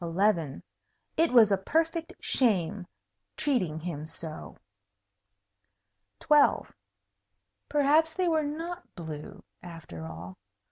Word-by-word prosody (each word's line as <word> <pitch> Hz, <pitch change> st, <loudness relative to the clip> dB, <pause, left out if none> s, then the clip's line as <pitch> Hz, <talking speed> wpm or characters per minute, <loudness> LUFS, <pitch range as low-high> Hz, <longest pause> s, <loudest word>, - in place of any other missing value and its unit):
It 330 Hz, +1 st, +3 dB
was 230 Hz, -4 st, +7 dB
a 195 Hz, -, +3 dB
perfect 325 Hz, -, 0 dB
shame, 195 Hz, -6 st, +1 dB, 0.5 s
treating 185 Hz, -, 0 dB
him 155 Hz, -3 st, -5 dB
so. 160 Hz, -1 st, -9 dB, 1.6 s
12. 295 Hz, -1 st, +4 dB, 1.0 s
Perhaps 300 Hz, +3 st, +3 dB
they 365 Hz, 0 st, +1 dB
were 320 Hz, -2 st, +3 dB
not 330 Hz, +4 st, -5 dB
blue, 155 Hz, -4 st, -8 dB, 0.2 s
after 165 Hz, -, -9 dB
all. 85 Hz, +4 st, -9 dB
225 Hz, 90 wpm, -29 LUFS, -, 1.6 s, was